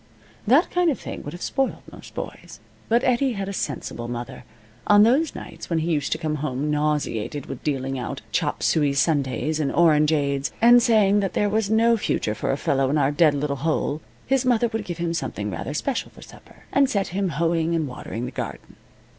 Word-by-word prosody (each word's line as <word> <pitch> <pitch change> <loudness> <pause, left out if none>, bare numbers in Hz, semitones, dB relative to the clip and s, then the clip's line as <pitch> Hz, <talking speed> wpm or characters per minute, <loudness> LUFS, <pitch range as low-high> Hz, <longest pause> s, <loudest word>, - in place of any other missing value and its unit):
That 275 - +4
kind 355 -1 +2
of 285 - -1
thing - - -7
would 145 - -7
have 175 - -7
spoiled 270 -1 -1
most - - -13
boys. - - -7 0.3
But 235 +2 +3
Eddie 255 +1 +2
had 195 -2 -4
a 200 - -4
sensible 125 -8 -4
mother. 120 +1 -6 0.4
On 205 0 +7
those 275 +8 +2
nights - - -9
when 165 - 0
he 160 +2 0
used 145 -3 -1
to - - -3
come 155 -2 -2
home 145 0 -2
nauseated 150 -3 -1
with 135 - -8
dealing 135 -2 -2
out 125 - -5
chop - - -1
suey 145 -3 +2
sundaes 145 0 0
and 145 -3 0
orangeades, 150 -4 +2
and 240 +2 +7
saying 210 -3 +4
that 195 -2 -1
there 205 - +1
was 215 0 0
no 230 +1 +4
future 110 - -1
for 110 - -2
a 135 - -1
fellow 135 -2 +1
in 150 - +1
our 140 -1 +2
dead 150 -1 +4
little 140 0 -2
hole, 155 0 -1 0.2
his 270 -1 +2
mother 240 -2 +2
would 220 -2 -4
give 175 -3 -5
him 170 -1 -2
something 105 - -3
rather 115 - -5
special 270 - -2
for - - -15
supper, - - -16
and 275 -1 +4
set 200 -6 0
him 190 +1 -1
hoeing 165 0 +1
and 160 -3 0
watering 125 -2 -6
the 125 - -5
garden. - - -7
160 Hz, 205 wpm, -23 LUFS, 140-215 Hz, 0.4 s, On